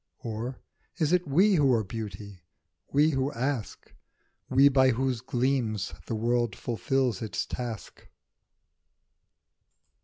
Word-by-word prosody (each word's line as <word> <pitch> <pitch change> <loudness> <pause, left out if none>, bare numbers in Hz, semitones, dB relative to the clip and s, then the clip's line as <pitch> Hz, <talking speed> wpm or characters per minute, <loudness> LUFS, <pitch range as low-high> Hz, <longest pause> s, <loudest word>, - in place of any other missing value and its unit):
Or 115 +3 -4 0.4
is 160 -1 +1
it 180 -1 +2
we 185 +9 +4
who 145 -7 +4
are 110 - +1
Beauty, 100 -3 -7 0.5
we 150 +3 +4
who 135 0 0
ask? 125 -3 -4 0.6
We 135 +2 +6
by 130 -1 +4
whose 130 -1 0
gleams 120 -6 -1
the 115 - -2
world 120 +1 0
fulfils 125 - -1
its 110 - -3
task. 120 -4 -7
125 Hz, 115 wpm, -28 LUFS, 110-135 Hz, 0.6 s, We